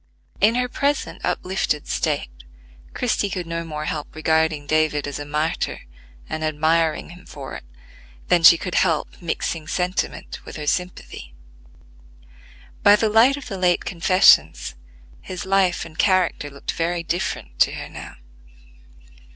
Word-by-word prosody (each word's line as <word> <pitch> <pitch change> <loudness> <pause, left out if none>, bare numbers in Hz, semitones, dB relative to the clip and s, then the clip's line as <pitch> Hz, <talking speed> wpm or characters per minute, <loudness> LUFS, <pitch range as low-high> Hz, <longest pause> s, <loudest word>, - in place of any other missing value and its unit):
In 215 +3 +4
her 250 0 +1
present 280 +3 -2
uplifted 180 -5 -1
state, 60 - -1 0.6
Christie 220 -4 0
could 180 -2 -4
no 165 0 -4
more 155 -2 -5
help 155 -4 -5
regarding 160 -1 +1
David 155 -1 +1
as 145 - -5
a 145 - -5
martyr 150 +2 -2 0.5
and 155 0 -4
admiring 155 +1 +1
him 175 +1 -13
for 135 -2 -9
it, - - -8 0.6
than 175 - +3
she 165 +1 +9
could 180 +1 -5
help 165 -1 0
mixing 165 -1 -3
sentiment 180 +2 -3
with - - -10
her 150 - -5
sympathy. 160 - -4 1.5
By 205 0 +7
the 215 +1 +1
light 235 +6 +5
of 285 - -9
the 195 -4 -5
late 180 -1 +2
confessions, 180 - +4 0.5
his 185 0 -6
life 190 -2 +2
and 160 -1 -13
character 185 -6 +2
looked 140 0 -5
very 170 +1 -2
different 160 - -3
to - - +4
her - - -6
now. - - -10
165 Hz, 145 wpm, -22 LUFS, 155-185 Hz, 1.5 s, she